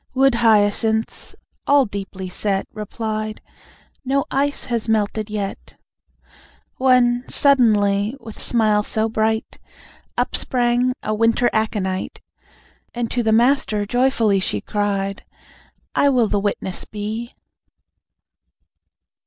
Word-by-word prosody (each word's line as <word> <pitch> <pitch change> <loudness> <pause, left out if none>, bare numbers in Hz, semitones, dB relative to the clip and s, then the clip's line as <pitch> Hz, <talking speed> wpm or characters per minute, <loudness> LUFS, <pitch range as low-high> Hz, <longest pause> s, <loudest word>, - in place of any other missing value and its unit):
Wood 270 0 +4
Hyacinths, 220 0 +1 0.3
all 285 -1 +5
deeply 195 -2 -6
set, 195 +1 -2
Replied: 215 0 -4 0.6
"No 275 +1 0
ice 285 +1 0
has 230 -2 -2
melted 215 0 0
yet." 205 -2 -5 1.0
When 250 -2 +3
suddenly, 215 -5 +3
with 225 -3 -10
smile 215 -3 +2
so 220 +1 -1
bright, 220 0 -1 0.6
Up - - 0
sprang 245 0 +1
a 215 - -1
Winter 230 +2 +2
Aconite, 205 -4 -2 0.8
And 235 -1 -2
to 245 - 0
the 220 -1 +1
Master 225 -3 +2
joyfully 230 -3 +2
She 105 - -1
cried: 195 - -2 0.7
"I 285 - +3
will 245 -4 +3
the 205 - 0
witness 195 -2 -3
be." 215 +3 -6
220 Hz, 105 wpm, -20 LUFS, 205-240 Hz, 1.0 s, all